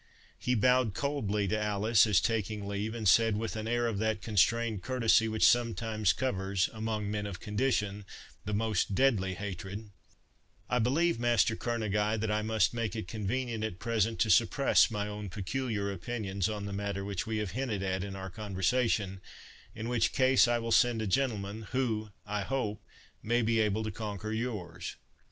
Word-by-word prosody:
He 125 - 0
bowed 125 -1 +3
coldly 105 -8 -1
to 110 +2 0
Alice, 105 +1 +3
as 100 -5 +4
taking 105 0 -2
leave, 100 +3 -3
and 110 -3 -2
said, 115 +2 +5
with 115 +1 -3
an 110 0 -4
air 120 +1 +1
of 110 -4 -1
that 110 0 0
constrained 110 0 +1
courtesy 115 -2 +3
which 110 -1 +3
sometimes 115 -4 +2
covers, 95 -3 -1
among 110 -2 -3
men 105 -1 -2
of 95 -3 -7
condition, 105 -3 -1 0.4
the 105 - -4
most 105 -2 0
deadly 95 -6 +2
hatred, 100 +2 -6 0.8
"I 125 - +1
believe, 135 +5 +2
Master 120 -2 +3
Kerneguy, 110 -2 -1
that 110 0 -1
I 105 0 +1
must 110 -2 +1
make 115 -2 -2
it 110 -5 -4
convenient 115 +2 -2
at 110 -5 -3
present 115 0 0
to 110 - +3
suppress 135 +4 +4
my 105 -2 -2
own 105 -1 -6
peculiar 105 +1 -2
opinions 100 0 -3
on 105 -1 -4
the 100 - -5
matter 100 -1 -3
which 100 -1 -3
we 110 -1 -1
have 105 -4 -2
hinted 115 -6 -2
at 95 -1 -1
in 100 -1 -6
our 95 -1 -6
conversation, 100 0 0 0.5
in 110 0 -5
which 120 -2 +1
case 130 -1 +5
I 120 0 +2
will 115 0 -4
send 115 -1 +4
a - - -2
gentleman, 105 -2 -1
who, 110 -5 -1 0.2
I 105 0 -2
hope, 105 -3 -2 0.4
may 120 +2 +1
be 115 0 +2
able 110 0 +1
to 110 - -3
conquer 105 0 -5
yours." 105 -7 -4
110 Hz, 175 wpm, -30 LUFS, 100-115 Hz, 0.8 s, said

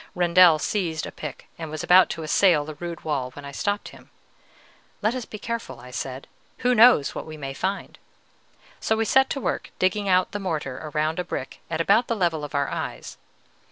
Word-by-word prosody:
Rendel 175 -1 +6
seized 160 -1 -2
a - - -7
pick, 150 -3 -8
and 160 -2 -5
was 155 -1 -5
about 185 +1 +6
to 165 - -5
assail 155 -1 +3
the 155 - -6
rude 170 +2 -7
wall, 140 -5 -1
when 145 +1 -10
I 140 - -7
stopped 205 +8 -2
him. - - -16 0.9
"Let 215 +3 +2
us 255 -3 -4
be 215 - -8
careful," 230 - -5
I 125 +1 -12
said; 130 +1 -5 0.4
"who 250 - +5
knows 235 - +6
what - - -6
we 155 0 -8
may 135 -2 -5
find?" 190 +7 -4 0.8
So 220 - 0
we 225 - +1
set 265 +4 +4
to 275 - -2
work - - -2
digging 195 +2 +1
out 185 0 +3
the 205 - -4
mortar 155 -9 -3
around 155 +2 -1
a - - 0
brick 130 - -6
at 165 -1 -2
about 205 +8 +3
the 230 - 0
level 170 -6 0
of 145 - -6
our 140 -1 +1
eyes. - - -5
170 Hz, 205 wpm, -24 LUFS, 150-205 Hz, 0.9 s, Rendel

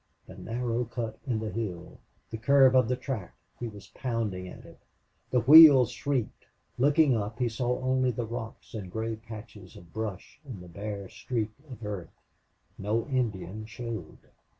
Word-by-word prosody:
the - - -12
narrow 120 +1 -2
cut 115 -1 -5
in 120 -4 0
the 110 -1 -4
hill! 95 -7 -5 0.3
the 110 - -4
curve 135 +1 +6
of 130 -3 +5
the 125 - +1
track! 125 -8 -5 0.2
He 120 - -3
was 105 -2 -11
pounding 110 -7 -3
at - - -11
it. - - -15 0.5
The 125 - +2
wheels 140 -1 +9
shrieked. 135 -5 -3 0.3
Looking 145 0 +4
up, 105 +1 -3
he 125 -1 +1
saw 120 +2 -1
only 130 0 +1
the 120 -1 -2
rocks 115 0 -7
and 100 -5 -6
gray 110 +2 -2
patches 110 -4 -11
of 85 -2 -15
brush 110 -4 -5
and 130 -9 -8
the 90 - -11
bare 100 +2 -6
streak 110 +1 -3 0.2
of 120 -4 -9
earth. 100 -5 -6 0.6
No 110 +3 0
Indian 110 -5 -2
showed. 115 +1 -6
115 Hz, 165 wpm, -29 LUFS, 105-125 Hz, 0.6 s, wheels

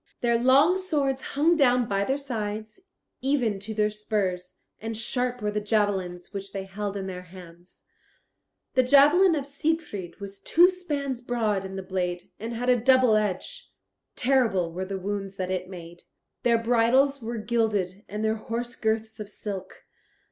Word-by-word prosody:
Their 235 -1 +2
long 275 +9 +5
swords 285 -8 0
hung 315 +5 +2
down 250 -5 +3
by 200 -1 0
their 270 +4 0
sides, 220 - -5 0.4
even 250 -7 +1
to 215 +3 -6
their 210 0 +2
spurs, 190 -4 -2 0.2
and 225 0 -5
sharp 245 +1 -1
were 210 - 0
the 210 0 -2
javelins 200 -4 -1
which 195 0 -6
they 195 -1 -3
held 200 +1 -4
in 195 - -4
their 185 -1 -5
hands. 175 -1 -15 0.9
The 255 - +5
javelin 295 +8 +6
of 285 -3 -2
Siegfried 280 - -3
was 200 -1 -8
two 350 +3 +5
spans 285 -8 -3
broad 220 -5 -1
in 190 0 -7
the 190 - -5
blade, 180 -2 -3
and 225 +3 -5
had 245 +2 -3
a 245 -2 +4
double 255 -2 +5
edge. 215 - -2 0.4
Terrible 230 -10 +2
were 185 +2 -3
the 195 0 -4
wounds 195 0 -4
that 185 -1 -3
it 185 0 -3
made. 175 -2 -10 0.4
Their 235 -1 +3
bridles 245 +4 +3
were 235 +1 -4
gilded, 210 -4 -1
and 210 +2 -3
their 220 0 +1
horse 235 +2 -4
girths 220 0 -2
of 210 -1 -6
silk. 200 -2 -7
220 Hz, 165 wpm, -26 LUFS, 195-255 Hz, 0.9 s, javelin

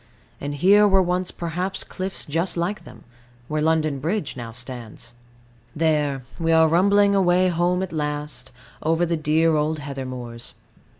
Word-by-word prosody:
And 145 +1 -4
here 200 +7 +5
were 195 -1 +4
once 180 +1 -1
perhaps 180 +3 -3
cliffs 190 0 -4
just 165 +5 -1
like 180 +5 -2
them, 115 -3 -13 0.4
where 155 0 -1
London 155 -2 +1
Bridge 165 +2 -2
now 120 -3 -7
stands. 120 -1 -7 0.6
There, 150 -4 +1 0.2
we 165 0 +1
are 160 0 +6
rumbling 200 +5 +4
away 185 -1 +3
home 175 +2 +1
at 190 - -6
last, 150 -2 -4 0.3
over 165 +2 +2
the 170 0 0
dear 155 +1 +2
old 155 +1 0
heather 140 -2 -6
moors. 120 -2 -7
160 Hz, 155 wpm, -23 LUFS, 145-180 Hz, 0.6 s, are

